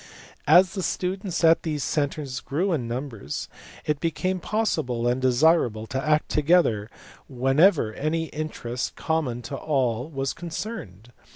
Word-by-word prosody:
As 185 0 +6
the 195 - -3
students 185 -1 -2
at 165 0 +6
these 150 -4 -2
centres 145 -3 -2
grew 170 - -1
in 125 -7 -1
numbers, 115 - -5 0.4
it 150 -2 0
became 185 +3 -1
possible 155 - -1
and 125 +2 +1
desirable 130 -4 +3
to 135 +3 -3
act 155 0 +2
to 150 - +1
gether 140 -10 +3 0.4
whenever 135 - +3
any 155 +6 -1
interest 125 -5 -4
common 140 -7 -1
to 140 - -5
all 130 -3 -1
was 135 -3 -2
concerned. 160 - -7
145 Hz, 135 wpm, -25 LUFS, 125-165 Hz, 0.4 s, As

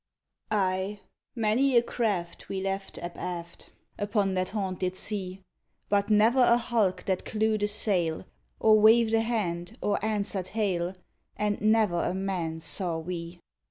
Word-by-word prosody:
Ay! 195 0 0 0.4
many 240 +4 +3
a 235 - +5
craft 200 -9 -2
we 195 - -2
left 195 0 -4
abaft 175 0 -6 0.3
Upon 205 -2 0
that 185 0 -1
haunted 185 -3 -2
sea; 190 -3 -4 0.5
But 200 0 +2
never 220 +5 +5
a 240 -1 +6
hulk 225 -5 0
that 190 -2 -1
clewed 215 0 0
a 205 - +2
sail, 185 -6 0 0.3
Or 215 -1 +6
waved 225 +1 +5
a 225 - +4
hand, 210 -3 -2
or 205 -1 -1
answered 200 -3 -1
hail, 185 -4 0 0.4
And 210 -1 -1
never 215 -5 +3
a 180 - -1
man 180 -4 -2
saw 170 0 -1
we. 170 +1 -6
200 Hz, 140 wpm, -28 LUFS, 180-215 Hz, 0.5 s, a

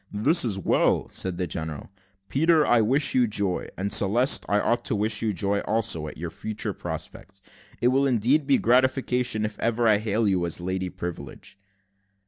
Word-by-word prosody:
"This 140 - +3
is 110 -6 -1
well," 95 - +1
said 95 -2 -2
the 90 - -1
general. 80 0 -6 0.4
"Peter, 160 +2 +2
I 120 -1 +3
wish 135 +7 +1
you 125 -2 +3
joy; 100 -4 -2
and, 100 +2 -1
Celeste, 115 +7 +4
I 105 - +2
ought 120 +3 0
to - - +1
wish 105 +1 0
you 110 - 0
joy 100 +2 -1
also, 100 -9 -1
at - - -9
your 85 +1 -6
future 110 +3 -5
prospects. 95 -1 -8 0.4
It 120 - +3
will 135 +2 +2
indeed 130 +4 +1
be 140 - +4
a - - +3
gratification 125 -2 +1
if 105 -1 -7
ever 115 0 0
I 105 -2 +4
hail 110 +1 0
you 95 -3 +1
as 85 - -2
Lady 95 +1 -3
Privilege." 85 -6 -8
110 Hz, 185 wpm, -25 LUFS, 95-125 Hz, 0.4 s, Celeste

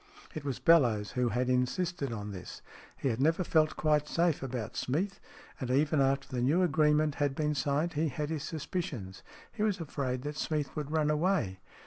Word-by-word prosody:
It 155 - -5
was 140 -4 -2
Bellowes 120 - +4
who 125 -1 +1
had 125 +2 0
insisted 140 +4 0
on 105 -2 -5
this. 95 -3 -9 0.3
He 135 - 0
had 115 +1 -1
never 165 +6 +3
felt 155 -2 +2
quite 150 -1 +2
safe 170 -1 +1
about 125 -5 -4
Smeath, 190 +9 -1 0.4
and 130 -4 -4
even 145 +3 +3
after 135 +1 +1
the 125 -1 -3
new 155 +9 +3
agreement 150 -2 +3
had 140 -2 +1
been 150 0 0
signed 145 +4 0
he 160 +2 +1
had 150 +3 -3
his 155 -3 -2
suspicions. 145 - -4 0.3
He 215 - -6
was 210 -3 +1
afraid 135 -5 -3
that 150 +1 -4
Smeath 150 -3 -2
would 150 -2 -3
run 155 -1 +2
away. 150 - +1
150 Hz, 185 wpm, -31 LUFS, 125-160 Hz, 0.4 s, Bellowes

